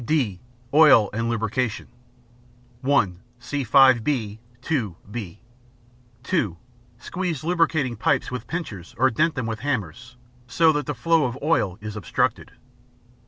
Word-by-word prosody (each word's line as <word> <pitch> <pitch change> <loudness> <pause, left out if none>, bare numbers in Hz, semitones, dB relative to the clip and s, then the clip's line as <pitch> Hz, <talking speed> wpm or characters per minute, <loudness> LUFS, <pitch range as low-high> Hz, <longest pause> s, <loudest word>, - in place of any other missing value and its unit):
(d) 120 - 0 0.3
Oil 145 -9 +6
and 115 +2 -1
Lubrication 115 +1 -2 1.0
(1) 130 -10 +1 0.2
See 130 +3 -4
5 130 -1 +5
b. 110 -6 -2 0.2
(2) 120 - -1 0.2
(b). 105 -4 -7 0.8
(2) 135 - -1 0.4
Squeeze 170 +3 -4
lubricating 160 -7 +1
pipes 130 +4 0
with 125 -2 -6
pincers 110 - -6
or 130 +3 +3
dent 155 +7 +1
them 130 -4 -2
with 110 -1 -4
hammers, 120 - -4 0.3
so 160 +6 +4
that 150 -1 -2
the 145 - -2
flow 165 +5 +2
of 125 0 -3
oil 105 - +1
is 105 0 -6
obstructed. 105 -6 -1
125 Hz, 130 wpm, -23 LUFS, 110-150 Hz, 1.0 s, Oil